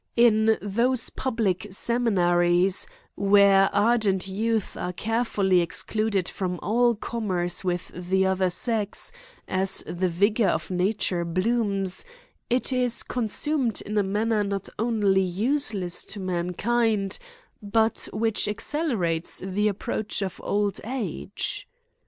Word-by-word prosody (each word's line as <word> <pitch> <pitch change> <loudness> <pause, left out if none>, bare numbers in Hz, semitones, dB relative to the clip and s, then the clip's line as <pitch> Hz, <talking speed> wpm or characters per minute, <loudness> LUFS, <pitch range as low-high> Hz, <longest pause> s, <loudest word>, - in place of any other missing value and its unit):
In 220 -2 +4
those 235 +5 +1
public 210 -7 -1
seminaries, 185 -5 +2 0.3
where 200 -1 +5
ardent 205 -3 +2
youth 220 +2 -1
are 180 - -3
care 225 +5 -1
fully 190 -5 +2
excluded 200 +2 0
from 180 -2 -3
all 240 +2 +2
commerce 185 -6 -2
with 180 -1 -2
the 185 +2 0
other 190 -1 +1
sex, 210 +2 -1 0.4
as 190 +1 0
the 185 +1 -1
vigour 200 +5 +2
of - - -2
nature 180 -1 0
blooms, 195 +1 0 0.5
it 250 +2 +2
is 250 -2 +1
consu 250 +6 0
med 235 -6 +1
in 210 - -5
a 210 - +4
manner 210 +2 0
not 200 -1 -3
only 210 -4 +2
useless 200 -1 0
to 210 - -8
mankind, 195 +4 0 0.4
but 220 +2 0
which 225 0 0
accelerates 210 - -1
the 200 +3 0
approach 210 +1 -2
of 190 - -5
old 205 -1 -1
age. 250 +1 -4
205 Hz, 120 wpm, -25 LUFS, 185-225 Hz, 0.5 s, where